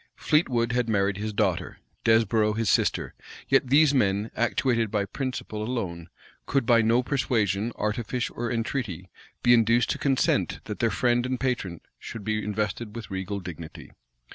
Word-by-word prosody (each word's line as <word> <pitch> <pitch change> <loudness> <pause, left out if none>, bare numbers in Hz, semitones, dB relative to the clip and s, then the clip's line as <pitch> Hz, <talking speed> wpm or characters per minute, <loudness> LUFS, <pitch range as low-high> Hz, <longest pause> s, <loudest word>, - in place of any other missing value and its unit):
Fleetwood 125 -7 +1
had 125 -1 0
married 100 -2 +1
his 105 +1 -3
daughter; 100 - -1 0.3
Desborow 110 -1 +3
his 115 0 +1
sister; - - +1 0.4
yet 135 -1 +3
these 145 +2 +5
men, 105 -4 +1
actuated 120 -1 +1
by 100 -1 0
principle 125 -2 -4
alone, 95 -8 -4 0.4
could 135 -3 +1
by 115 -1 +5
no 115 +3 +3
persuasion, 115 -6 0
artifice, 115 +3 -2
or 120 0 -3
entreaty 115 - -3 0.3
be 120 - +6
induced 115 0 +3
to - - -3
consent 135 -2 +1
that - - -6
their - - +2
friend 120 0 +1
and 130 -1 -2
patron 115 -10 -2 0.2
should 115 - -8
be 110 0 -1
invested 105 +1 -3
with 115 -3 -7
regal 95 +1 -3
dignity. 85 -3 -9
115 Hz, 155 wpm, -26 LUFS, 105-125 Hz, 0.4 s, be